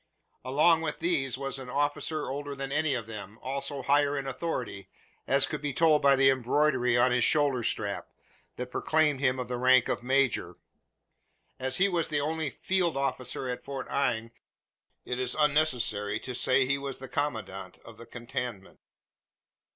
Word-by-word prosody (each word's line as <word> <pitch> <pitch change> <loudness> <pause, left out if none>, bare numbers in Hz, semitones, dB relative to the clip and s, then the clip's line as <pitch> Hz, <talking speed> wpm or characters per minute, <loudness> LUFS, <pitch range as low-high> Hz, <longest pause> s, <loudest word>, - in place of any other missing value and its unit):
Along 155 +6 +3
with 155 -2 -3
these 145 -7 0
was 135 0 -3
an 130 -1 -8
officer 145 +3 -1
older 145 +1 -4
than 135 0 -5
any 150 -1 +1
of 115 -3 -4
them, 105 -1 -9
also 140 +1 -4
higher 145 +2 +2
in 135 - -3
authority, 125 - -4 0.4
as 140 0 +5
could 150 - -5
be 145 -2 -2
told 160 -2 +4
by 140 -1 +5
the 135 0 +5
embroidery 130 -1 +2
on 125 +1 +4
his 125 -1 +2
shoulder 145 -4 +3
strap, 105 -3 -1 0.5
that 125 0 -6
proclaimed 155 -2 +1
him 130 -2 +2
of 125 -2 -4
the 125 0 -3
rank 130 -1 +5
of - - -1
major. 130 0 +1 1.0
As 130 0 0
he 195 - +4
was 175 -4 0
the 150 -2 +1
only 160 +1 -1
"field 175 +1 -1
officer" 130 -1 -2
at 125 -1 -4
Fort 135 -1 -6
Inge, 115 -5 0 0.7
it 125 - -3
is 125 -1 -1
unnecessary 125 -9 +1
to 125 - -6
say 130 +2 +2
he 140 +2 0
was 140 -1 -5
the 130 - -9
commandant 105 -11 -4
of 115 -2 -12
the 115 - -12
cantonment. 120 -4 -6
135 Hz, 170 wpm, -28 LUFS, 125-145 Hz, 1.0 s, as